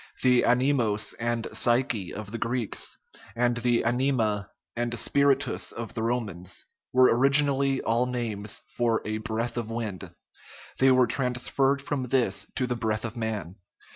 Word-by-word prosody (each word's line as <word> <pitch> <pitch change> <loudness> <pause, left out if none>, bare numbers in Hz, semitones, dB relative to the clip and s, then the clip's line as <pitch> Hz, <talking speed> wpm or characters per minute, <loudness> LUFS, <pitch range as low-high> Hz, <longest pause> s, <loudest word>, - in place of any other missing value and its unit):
The 125 -1 +5
anemos 120 -4 +2
and 120 -1 -1
psyche 120 -5 +1
of 105 -1 -7
the 115 - -5
Greeks, 115 -2 -1 0.4
and 120 0 +1
the 120 0 +1
anima 115 -5 0 0.3
and 120 0 -2
spiritus 140 +4 +2
of 120 -2 -7
the 110 - -3
Romans, 105 -7 -2 0.3
were 130 0 +5
origi 140 +4 +5
nally 135 -1 +1
all 120 +2 +1
names 110 -5 -3
for 115 -2 +1
" - - -23
a 110 0 -2
breath 115 +1 -3
of 115 -2 -3
wind 115 -5 -4 0.4
"; - - -18
they 135 0 +5
were 130 -1 +5
trans 125 0 -1
ferred 135 0 +2
from 140 -3 -2
this 100 -6 +1
to 130 - 0
the 125 -1 -2
breath 110 -1 -2
of 115 +1 -5
man. 105 -6 -4
120 Hz, 165 wpm, -27 LUFS, 110-125 Hz, 0.4 s, The